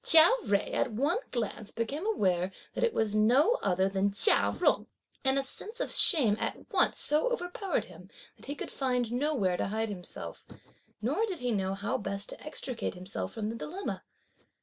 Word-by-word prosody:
Chia 325 +3 +8
Jui 200 -1 0
at 255 - +1
one 285 - +1
glance 220 -3 -3
became 280 - -3
aware 185 - +1 0.2
that - - -2
it 475 - +3
was 220 - 0
no 260 - +4
other 190 0 +2
than 195 +1 0
Chia 210 - +3
Jung; - - +2 0.4
and 265 0 +3
a 275 - +2
sense 430 - -7
of - - -1
shame 255 - +4
at - - -2 0.2
once - - +3
so 305 +12 +4
overpowered 380 -2 -2
him - - -14 0.3
that - - -15
he 285 - -3
could - - -6
find 250 -3 -1
nowhere 245 -9 0
to - - -1
hide 220 +2 -2
himself; 180 -3 -3 0.6
nor 440 - +1
did 375 -4 -4
he 250 -3 -1
know 195 -2 -1
how 200 +1 -2
best 200 0 -3
to - - -8
extricate 255 -8 -4
himself 185 +2 -2
from 215 -2 -3
the 225 - -4
dilemma. 360 +11 -5
235 Hz, 185 wpm, -30 LUFS, 200-305 Hz, 0.6 s, Chia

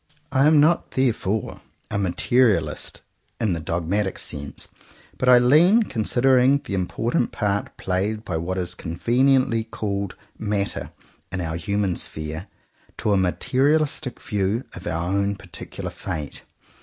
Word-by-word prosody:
I 135 +2 +4
am 155 -1 +6
not 160 +4 +3
therefore 110 -5 0 0.3
a 100 - 0
materialist 100 -2 +1 0.4
in 105 -5 +1
the 85 - -2
dogmatic 90 +5 -1
sense, 70 -1 -5 0.5
but 125 - +2
I 125 - +9
lean, 160 - +5
considering 130 - +3
the - - -6
important 110 +6 0
part 105 -1 -2
played 100 +4 -1
by 90 -4 -2
what 90 +3 -3
is 90 -1 -1
con 85 -2 -6
veniently 125 0 +2
called 100 -3 -3 0.2
matter 105 -2 -2 0.4
in 90 - -3
our 80 -2 -2
human 95 +2 -1
sphere, 80 +4 -3 0.5
to 105 - 0
a - - +4
materialistic 135 - +1
view 105 +3 -1
of 90 - -8
our 85 0 -1
own 100 +1 +1
particular 90 -3 -8
fate. 75 -2 -5
100 Hz, 135 wpm, -23 LUFS, 90-125 Hz, 0.5 s, I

